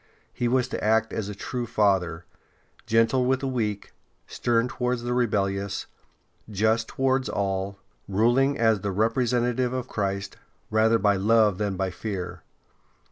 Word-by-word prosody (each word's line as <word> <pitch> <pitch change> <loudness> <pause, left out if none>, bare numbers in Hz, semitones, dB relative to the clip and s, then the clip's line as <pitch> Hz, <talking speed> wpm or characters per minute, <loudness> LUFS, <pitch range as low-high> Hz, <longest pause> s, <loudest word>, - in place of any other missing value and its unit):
He 120 - -1
was 125 +1 +2
to - - -4
act 110 +1 +2
as 105 -2 -3
a 105 - -6
true 120 +4 -4
father, 95 -7 +1 0.6
gentle 115 +3 +3
with 130 +1 +1
the 135 - -2
weak, 110 -6 -3 0.3
stern 120 0 0
towards 125 -1 -2
the 120 0 -1
rebellious, 100 -5 -1 0.6
just 110 +2 +1
towards 135 0 0
all, 95 0 -2 0.3
ruling 120 +8 +2
as 110 -4 +2
the 100 - -2
representative 120 +3 +1
of 130 -1 -3
Christ, 100 -3 -3 0.3
rather 110 +1 +4
by 100 -2 +2
love 105 -1 +3
than 100 -2 -1
by 95 -1 -1
fear. 95 -2 -5
110 Hz, 140 wpm, -25 LUFS, 100-125 Hz, 0.6 s, rather